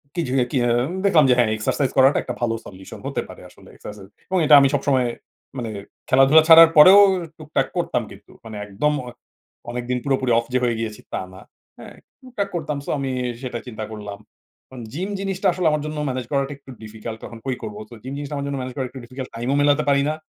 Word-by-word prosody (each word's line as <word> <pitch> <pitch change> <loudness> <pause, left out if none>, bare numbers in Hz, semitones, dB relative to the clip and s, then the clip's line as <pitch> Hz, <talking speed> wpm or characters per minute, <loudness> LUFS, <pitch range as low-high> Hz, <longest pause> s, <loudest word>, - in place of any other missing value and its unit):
কি 170 - 0
যে, - - -3 0.2
কি 135 - +1
হ্যাঁ। 120 +1 +2 0.2
দেখলাম 165 -7 +5
যে - - +6
হ্যাঁ 115 -3 +3
এক্সারসাইজ 130 +5 -1
করাটা 135 +2 +5
একটা 125 - -5
ভালো 115 -1 0
সলিউশন 95 -1 -11
হতে - - -2
পারে - - -12
আসলে। - - -19
এক্সারসা 105 -1 -11 0.3
এবং 185 - 0
এটা 150 0 +6
আমি 135 - +4
সবসময় 135 -3 +1 0.5
মানে 115 -2 -4 0.4
খেলাধুলা 135 +4 +6
ছাড়ার 165 0 +10
পরেও 185 +7 +9 0.4
টুকটাক 155 0 -1
করতাম 145 -8 -1
কিন্তু। 100 +1 -17
মানে 110 -2 -9
একদম 110 +10 0
অ - - -7 0.6
অনেকদিন 125 +1 -3
পুরোপুরি 130 -3 +1
অফ 115 - -1
যে 125 - +3
হয়ে 115 -2 0
গিয়েছি 110 -2 -5
তা - - -2
না। 95 - -12 0.4
হ্যাঁ? - - -12 0.3
টুকটাক 225 -6 -4
করতাম। 150 -3 -3
সো - - -6
আমি 135 -1 -3 0.3
সেটা 120 -2 -4
চিন্তা 110 -3 -6
করলাম। 105 -1 -8 0.7
জিম 185 +7 -4
জিনিসটা 195 0 -3
আসলে 175 -1 -2
আমার 150 -1 -1
জন্য 155 0 -5
ম্যানেজ 130 -2 -4
করাটা 140 0 -1
একটু 135 -1 -15
ডিফিকাল্ট 110 +1 -8
তখন 115 - -9
কই 130 -2 -1
করবো। 105 -1 -7
তো - - -10
জিম 130 +2 -7
জিনিসটা 145 0 -6
আমার 140 0 -3
জন্য 140 -1 -3
ম্যানেজ 125 0 -6
করাটা 130 -2 -3
একটু 130 0 -10
ডিফিকাল্ট 130 +2 -8
টাইমও 125 +4 -1
মেলাতে 145 +1 +3
পারিনা। 140 +2 +2
130 Hz, 205 wpm, -21 LUFS, 120-150 Hz, 0.7 s, ছাড়ার